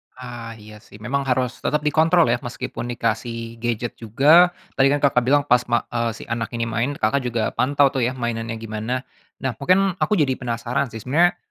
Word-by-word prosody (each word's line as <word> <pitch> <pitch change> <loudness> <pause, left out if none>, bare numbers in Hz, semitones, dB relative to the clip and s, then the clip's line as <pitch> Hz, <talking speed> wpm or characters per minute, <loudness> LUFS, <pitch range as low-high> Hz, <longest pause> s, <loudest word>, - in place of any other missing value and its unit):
Ah, 120 -2 -8
iya, 105 0 -13
sih. 105 - -18
Memang 135 +4 -2
harus 125 -1 0
tetap 150 0 -1
dikontrol 160 +3 +4
ya, 120 - +1
meskipun 120 -1 -6
dikasih 115 0 -3
gadget 120 0 -2
juga 145 +11 +5 0.3
tadi 135 0 +5
kan 145 - +2
Kakak 130 -3 +4
bilang 145 +2 +3
pas, 125 -3 +4
ma 120 -1 +1
eee, 115 -1 0
si - - -10
anak 115 0 -3
ini 115 - -1
main, 115 +5 -1
Kakak 120 +6 +1
juga 115 -2 -1
pantau 140 +2 +3
tuh, 130 - -1
ya, 130 - -3
mainannya 115 -1 -3
gimana. 115 +3 -4 0.4
Nah, 130 - 0
mungkin 185 +5 +3
aku 210 - +2
jadi 140 -5 +2
penasaran 120 +1 -2
sih, 110 -2 -9
sebenarnya, 175 +7 +3
125 Hz, 195 wpm, -22 LUFS, 115-140 Hz, 0.4 s, juga